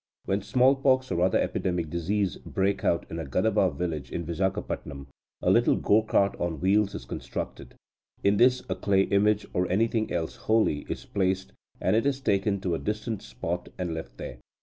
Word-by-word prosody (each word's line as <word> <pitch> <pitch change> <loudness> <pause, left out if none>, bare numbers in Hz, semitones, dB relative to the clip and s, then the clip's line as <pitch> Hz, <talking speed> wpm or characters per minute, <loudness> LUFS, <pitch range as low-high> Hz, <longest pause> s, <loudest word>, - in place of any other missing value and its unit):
When 100 +1 0
smallpox 130 +3 +3
or 85 - 0
other 95 +1 +3
epidemic 85 -4 -1
disease 95 +3 -1
breaks 100 +1 -1
out 85 0 +1
in 85 - -4
a - - -3
Gadaba 95 +7 +2
village 80 -7 -4
in 85 - -3
Vizagapatam, 85 -5 -3 0.4
a - - +4
little - - +4
go 105 +2 +3
cart 100 -2 +2
on 85 -3 -2
wheels 100 +2 +2
is - - -7
constructed. - - -6 0.5
In 100 +1 +3
this 125 +2 +4
a - - 0
clay 95 -1 +2
image, 105 +1 +2
or 90 0 0
anything 110 +3 +1
else 80 -2 -2
holy, 110 -10 +1
is - - -4
placed, 95 -1 -1 0.3
and 95 - +2
it 115 +5 +2
is 135 -1 0
taken 100 -4 +1
to 90 -3 -1
a 80 - -1
distant 105 0 -3
spot, 90 -4 -4
and 90 -2 -2
left 70 -7 -7
there. - - -7
95 Hz, 180 wpm, -27 LUFS, 85-105 Hz, 0.5 s, a